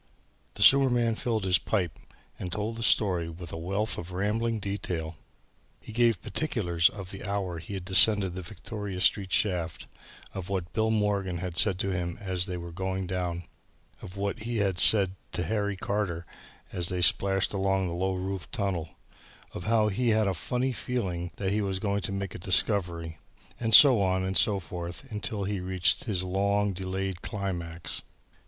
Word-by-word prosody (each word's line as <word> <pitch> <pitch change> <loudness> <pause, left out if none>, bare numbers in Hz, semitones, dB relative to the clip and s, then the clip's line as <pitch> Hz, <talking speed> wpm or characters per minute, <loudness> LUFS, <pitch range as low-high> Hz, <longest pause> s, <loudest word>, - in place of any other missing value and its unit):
The - - +1
sewer 135 -1 +8
man 120 -2 +2
filled 110 -1 -2
his 90 -2 +3
pipe 90 -7 -2 0.4
and 90 - -5
told 105 +4 -3
the 115 - -7
story 90 -7 +3
with 85 0 -8
a - - -3
wealth 100 +6 -2
of 90 +2 -8
rambling 110 +5 0
detail. 90 -5 -4 0.6
He - - -11
gave 115 -3 +2
particulars 90 - +1
of 95 -3 -9
the 95 - -8
hour 100 -4 -2
he 85 +5 -7
had 95 -2 -6
descended 95 0 +4
the 95 - -5
Victoria 105 0 -7
Street 95 0 +2
shaft, 90 -6 0 0.5
of 95 -1 -6
what 95 -3 -3
Bill 110 0 +1
Morgan 100 -4 0
had 90 -1 -5
said 95 0 +3
to 100 +1 -1
him 85 -1 -3
as 95 -2 -1
they 90 -1 -4
were 85 0 -7
going 95 +2 -3
down, 90 -1 -3 0.6
of 90 +2 -10
what 100 +3 -2
he 115 +1 -3
had 95 -3 0
said 100 -4 +6 0.2
to 90 - -1
Harry 100 +2 -1
Carter 95 -4 -2 0.5
as 90 -2 0
they 90 -1 -1
splashed 95 +2 +4
along 95 -1 +1
the 85 - -4
low 95 +2 -1
roofed 95 -2 -5
tunnel, 90 -5 -2 0.6
of 90 - -7
how 110 -1 +3
he 120 +4 0
had 110 -1 +3
a 95 - +1
funny 125 +9 -1
feeling 95 -9 -3
that 95 -1 -2
he 105 +1 +1
was 95 -2 -1
going 100 +1 -1
to - - -4
make 100 -1 -4
a - - -7
discovery, 85 -4 0 0.4
and 115 -2 +6
so 130 -7 +9
on 95 -1 +1
and 95 0 -2
so 105 -1 +4
forth 85 -1 -7
until 105 -1 -3
he 100 0 -2
reached 90 0 0
his 95 -6 0
long 100 +2 +1
delayed 95 0 -4
climax. 85 -5 -4
95 Hz, 180 wpm, -28 LUFS, 90-105 Hz, 0.6 s, so